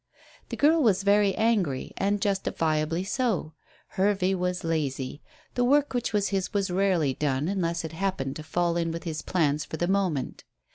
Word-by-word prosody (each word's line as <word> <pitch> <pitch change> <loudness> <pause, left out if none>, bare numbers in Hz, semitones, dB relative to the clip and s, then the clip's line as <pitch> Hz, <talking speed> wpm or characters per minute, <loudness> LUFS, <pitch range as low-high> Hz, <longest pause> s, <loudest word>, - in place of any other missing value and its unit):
The - - -5
girl 315 +3 +4
was 200 -7 +3
very 200 -1 +3
angry, 200 - 0
and 200 +1 0
justifiably 165 -4 0
so. 200 - -1 0.4
Hervey 195 -1 +1
was 180 -1 -2
lazy. 145 -4 -2 0.3
The 245 - +1
work 285 +3 +3
which 245 -1 -1
was 205 -2 +1
his 190 -2 -1
was 195 -2 0
rarely 180 -7 +2
done 145 +1 -1
unless 170 -3 -1
it 160 - -6
happened 165 -6 -2
to 155 - -7
fall 175 +1 0
in 165 -1 0
with 165 0 -5
his 160 -3 -4
plans 150 -4 +1
for 160 - -6
the 175 - 0
moment. 185 -9 -1
180 Hz, 175 wpm, -27 LUFS, 160-200 Hz, 0.4 s, girl